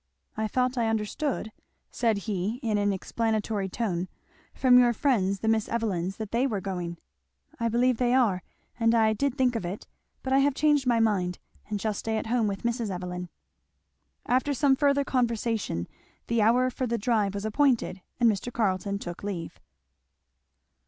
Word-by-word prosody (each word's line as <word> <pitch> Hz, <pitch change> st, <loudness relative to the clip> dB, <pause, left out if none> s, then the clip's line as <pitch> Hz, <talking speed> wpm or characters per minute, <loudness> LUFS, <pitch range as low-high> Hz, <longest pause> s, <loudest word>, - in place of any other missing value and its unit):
"I 220 Hz, 0 st, -1 dB
thought 250 Hz, +3 st, 0 dB
I 230 Hz, -, +2 dB
understood," 220 Hz, +3 st, -2 dB, 0.4 s
said 230 Hz, -4 st, +1 dB
he 205 Hz, 0 st, -1 dB
in 215 Hz, -3 st, +1 dB
an 205 Hz, 0 st, +2 dB
explanatory 215 Hz, 0 st, -1 dB
tone, 185 Hz, -4 st, -2 dB, 0.4 s
"from 250 Hz, -1 st, +5 dB
your 240 Hz, -1 st, +4 dB
friends 200 Hz, -7 st, +1 dB
the 220 Hz, -, -2 dB
Miss 220 Hz, -1 st, +2 dB
Evelyns, 195 Hz, -5 st, -1 dB
that 215 Hz, -2 st, -6 dB
they 245 Hz, +4 st, +2 dB
were 215 Hz, -6 st, -2 dB
going." 180 Hz, -3 st, -4 dB, 0.6 s
"I 230 Hz, 0 st, +1 dB
believe 245 Hz, +1 st, +2 dB
they 245 Hz, +1 st, +2 dB
are, 215 Hz, -8 st, +3 dB, 0.4 s
and 230 Hz, 0 st, +3 dB
I 220 Hz, -1 st, +4 dB
did 275 Hz, +4 st, -1 dB
think 255 Hz, -2 st, +2 dB
of 225 Hz, -, -2 dB
it; 180 Hz, +4 st, -5 dB, 0.4 s
but 265 Hz, -, -1 dB
I 270 Hz, -, +5 dB
have 280 Hz, 0 st, +2 dB
changed 295 Hz, -3 st, +2 dB
my 235 Hz, -2 st, +3 dB
mind, 190 Hz, -5 st, +1 dB, 0.3 s
and 210 Hz, -1 st, -2 dB
shall 215 Hz, +1 st, -1 dB
stay 220 Hz, +2 st, -2 dB
at -, -, -3 dB
home 230 Hz, -1 st, +1 dB
with 195 Hz, -1 st, -4 dB
Mrs. 235 Hz, -2 st, -1 dB
Evelyn." 180 Hz, -1 st, -5 dB, 1.0 s
After 260 Hz, +3 st, +1 dB
some 275 Hz, 0 st, +4 dB
further 280 Hz, 0 st, +2 dB
conversation 230 Hz, -, -1 dB, 0.4 s
the 235 Hz, -1 st, +1 dB
hour 250 Hz, +4 st, +3 dB
for 255 Hz, 0 st, -2 dB
the 235 Hz, 0 st, 0 dB
drive 210 Hz, -3 st, +1 dB
was 200 Hz, +1 st, -4 dB
appointed, 230 Hz, -5 st, +1 dB, 0.2 s
and 240 Hz, -, +5 dB
Mr. 220 Hz, +2 st, 0 dB
Carleton 200 Hz, -3 st, 0 dB
took 175 Hz, -2 st, -7 dB
leave. 185 Hz, -5 st, -5 dB
225 Hz, 170 wpm, -27 LUFS, 200-245 Hz, 1.0 s, from